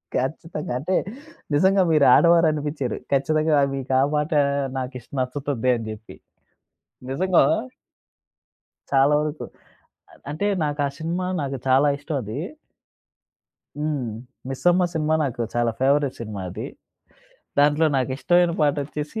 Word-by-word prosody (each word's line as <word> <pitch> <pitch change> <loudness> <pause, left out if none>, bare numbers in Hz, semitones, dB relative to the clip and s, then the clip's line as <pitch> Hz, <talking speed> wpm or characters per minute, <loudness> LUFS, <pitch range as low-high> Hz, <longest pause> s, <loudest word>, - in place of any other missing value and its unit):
ఖచ్చితంగా. 150 +1 -3
అంటే, 185 +7 -1 0.6
నిజంగా 190 +4 +4
మీరు 150 -3 +4
ఆడవారు 170 -1 +5
అనిపిచ్చారు. 145 -4 -3 0.2
ఖచ్చితంగా 155 +2 +2 0.2
మీకు 135 -1 -4
ఆ - - +4
పాటా, 150 0 +2 0.4
నాకిష్ 125 -2 -6
నచ్చుతుంది 130 -1 -1
అని 115 -2 -5
జెప్పి. 110 0 -10 1.0
నిజంగా 185 +4 +3 1.5
చాలా 140 +1 +4
వరుకు. 150 0 -4 0.7
అద్ - - -21
అంటే, 170 +7 -2 0.2
నాకా 145 -1 -1
సినిమా 175 +3 -2 0.2
నాకు 135 -1 -3
చాలా 135 +3 +4
ఇష్టవదీ. 140 -7 -4 1.4
హ్మ్. 150 -4 -2 0.4
'మిస్సమ్మ' 175 +7 +2
సినిమా 155 -1 +1
నాకు 125 -4 -3
చాలా 120 -1 +1
ఫేవరెట్‌ 140 0 +2
సినిమా 105 -4 -6
అది. 90 - -6 0.9
దాంట్లో 145 +2 +4
నాకిష్టమైన 155 +7 +2
పాటొచ్చేసీ, 150 +4 -1
145 Hz, 110 wpm, -23 LUFS, 130-155 Hz, 1.5 s, ఆడవారు